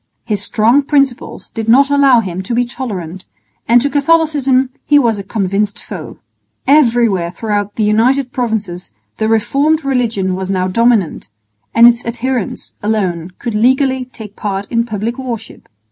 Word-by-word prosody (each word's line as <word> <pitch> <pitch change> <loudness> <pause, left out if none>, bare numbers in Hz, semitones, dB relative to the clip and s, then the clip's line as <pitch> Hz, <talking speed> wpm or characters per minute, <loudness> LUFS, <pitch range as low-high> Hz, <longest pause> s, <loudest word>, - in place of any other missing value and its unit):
His 210 -4 -2
strong 230 +6 +2
principles 275 -3 -1
did 225 -1 -4
not 275 +4 +5
allow 275 -4 +5
him 185 -3 -5
to 210 +5 -4
be 245 +1 +2
tolerant, 195 -8 -6 0.4
and 235 +2 +5
to 285 - +1
Catholicism 285 -4 +2
he 295 - +4
was 230 -7 +2
a - - -5
convinced 200 0 -1
foe. - - -9 0.5
Everywhere 235 - +3
throughout 205 +2 -3
the 220 - -1
United 245 +5 +2
Provinces 220 -9 -3 0.2
the 220 - 0
reformed 280 +8 +1
religion 230 -8 0
was 190 0 -5
now 185 -1 0
dominant, 225 - +1 0.5
and 230 +1 +8
its 240 0 +3
adherents 240 -1 -4
alone 185 -5 -2
could 235 - -4
legally 260 +3 +2
take 220 -5 -12
part 200 -1 -3
in 230 0 +1
public 225 +3 -3
worship. 235 -4 -7
230 Hz, 150 wpm, -15 LUFS, 205-260 Hz, 0.5 s, and